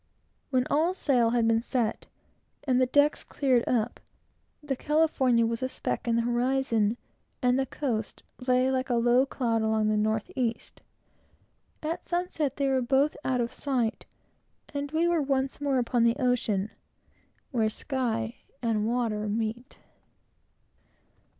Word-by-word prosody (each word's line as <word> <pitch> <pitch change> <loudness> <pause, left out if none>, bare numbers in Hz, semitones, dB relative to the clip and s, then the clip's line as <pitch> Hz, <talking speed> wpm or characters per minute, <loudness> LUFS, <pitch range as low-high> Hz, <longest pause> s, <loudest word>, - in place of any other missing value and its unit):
When 255 -2 +2
all 330 +5 +2
sail 250 -10 +2
had 230 -1 +2
been 225 0 +3
set, 235 -2 -2 0.6
and 260 -3 +2
the 255 - +3
decks 290 +3 +3
cleared 255 -4 +1
up, 240 -1 0 0.6
the 285 -2 -2
California 265 -6 +2
was 230 +1 -2
a 260 - -1
speck - - -3
in 230 - +2
the 235 - +2
horizon, 240 -2 +1 0.5
and 250 +1 +3
the 265 - 0
coast 230 -7 -3 0.2
lay 255 +1 +3
like 260 0 -1
a 245 - +2
low 240 +3 +3
cloud 230 -4 0
along 220 -1 +1
the 215 - +2
north 215 0 0
east. 240 -3 -3 1.0
At 330 +3 -3
sunset 345 -6 -2
they 280 - +1
were 265 -1 +2
both 270 +4 +2
out 255 -2 +1
of 235 +1 -3
sight, 255 -5 -2 0.7
and 285 0 -3
we 325 +2 +2
were 340 -2 +2
once 270 0 -1
more 280 -2 +1
upon 240 -1 +1
the 235 0 +4
ocean 235 -6 0 0.8
where 225 -5 +1
sky 230 -2 -2 0.2
and 220 -3 0
water 225 -3 -1
meet. 225 +4 -3
250 Hz, 145 wpm, -28 LUFS, 230-270 Hz, 1.0 s, the